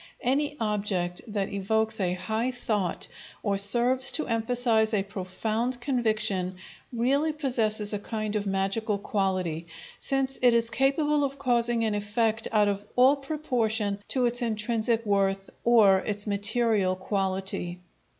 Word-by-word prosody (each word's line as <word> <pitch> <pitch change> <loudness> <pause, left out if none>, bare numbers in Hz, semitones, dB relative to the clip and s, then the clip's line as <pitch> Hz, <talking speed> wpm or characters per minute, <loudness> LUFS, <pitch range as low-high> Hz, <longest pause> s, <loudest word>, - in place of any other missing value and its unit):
Any 290 +4 0
object 200 -5 -2
that 205 -2 -3
evokes 220 +3 0
a 180 -2 0
high 220 +7 -2
thought 215 -7 -2 0.4
or 200 -2 0
serves 245 +6 +4
to 310 - +3
emphasize 230 -1 +2
a 195 - +1
profound 215 +5 -3
conviction 215 -8 +1 0.4
really 270 +6 +1
possesses 220 -8 0
a 205 - -2
kind 215 0 -4
of 205 -1 -2
magical 195 +3 -1
quality, 185 -5 -2 0.3
since 270 0 0
it 245 -2 +5
is 230 0 +1
capable 290 +2 +1
of 275 0 -3
causing 240 -3 +1
an 220 -1 0
effect 215 +2 -1
out 210 -2 +3
of 200 0 -2
all 260 +3 +5
proportion 240 -8 -2
to 255 -2 +1
its 240 +1 +1
intrinsic 230 0 0
worth 195 -1 0
or 215 -5 +5
its 205 +1 -1
material 205 -1 +2
quality. 190 -2 -3
220 Hz, 135 wpm, -26 LUFS, 200-245 Hz, 0.4 s, it